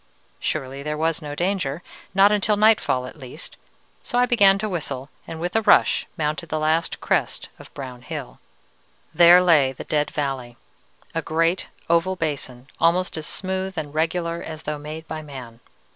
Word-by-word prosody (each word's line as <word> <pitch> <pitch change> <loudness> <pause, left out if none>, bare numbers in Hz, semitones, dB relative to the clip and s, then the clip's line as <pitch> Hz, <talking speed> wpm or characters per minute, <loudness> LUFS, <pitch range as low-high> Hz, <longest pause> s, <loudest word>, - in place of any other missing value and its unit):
Surely 135 +1 -3
there 150 +1 -3
was 160 +1 0
no 145 -1 -6
danger, 175 -4 -1 0.3
not 195 +1 +6
until 210 0 +2
nightfall 210 -12 +3
at 140 - -10
least; 135 +4 -9 0.5
so 245 - -3
I 245 - +5
began 200 -5 +5
to 215 +2 -2
whistle, 140 -8 -4 0.2
and 160 - -6
with 175 +4 -3
a 225 - +4
rush 210 - +4
mounted 155 +1 -2
the 155 - -1
last 155 +2 0
crest - - -1
of - - -13
brown 125 -3 -7
hill. 145 -1 -7 0.7
"There 175 +1 +8
lay 150 -7 +4
the - - -8
Dead 150 -1 0
Valley! 135 -5 -3 0.6
A - - -1
great 165 +3 0 0.2
oval 170 +3 +2
basin, 140 -7 -4
almost 175 +3 +2
as 155 -1 -5
smooth 190 0 -3
and 145 -2 -4
regular 170 +1 -1
as 160 -1 -8
though 150 0 -3
made 155 +2 -8
by 160 0 -5
man. 130 -6 -10
160 Hz, 170 wpm, -23 LUFS, 145-180 Hz, 0.7 s, There